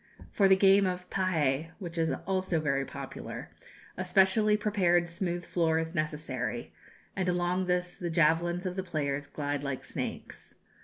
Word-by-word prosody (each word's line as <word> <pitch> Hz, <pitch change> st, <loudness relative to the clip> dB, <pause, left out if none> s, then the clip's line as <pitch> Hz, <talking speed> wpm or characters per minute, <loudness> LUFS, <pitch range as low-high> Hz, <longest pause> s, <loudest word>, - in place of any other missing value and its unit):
For 200 Hz, -, +4 dB
the 190 Hz, -, +7 dB
game 195 Hz, 0 st, +5 dB
of 180 Hz, 0 st, -3 dB
pahé, 160 Hz, -6 st, +1 dB
which 175 Hz, -4 st, -7 dB
is 165 Hz, -1 st, +1 dB
also 185 Hz, -3 st, 0 dB
very 140 Hz, -3 st, 0 dB
popular, -, -, -7 dB, 0.4 s
a 185 Hz, -, -3 dB
specially 195 Hz, +3 st, +4 dB
prepared 185 Hz, -5 st, +2 dB
smooth 175 Hz, 0 st, -3 dB
floor 165 Hz, -2 st, +1 dB
is 160 Hz, 0 st, -2 dB
necessary, 140 Hz, -, -3 dB, 0.4 s
and 185 Hz, -1 st, 0 dB
along 180 Hz, +1 st, 0 dB
this 180 Hz, 0 st, 0 dB
the 175 Hz, -, -2 dB
javelins 170 Hz, +2 st, +2 dB
of 180 Hz, -1 st, -2 dB
the 190 Hz, -, -1 dB
players 145 Hz, -5 st, -2 dB
glide 145 Hz, -1 st, -3 dB
like 140 Hz, -2 st, -3 dB
snakes. -, -, -6 dB
175 Hz, 155 wpm, -30 LUFS, 155-185 Hz, 0.4 s, the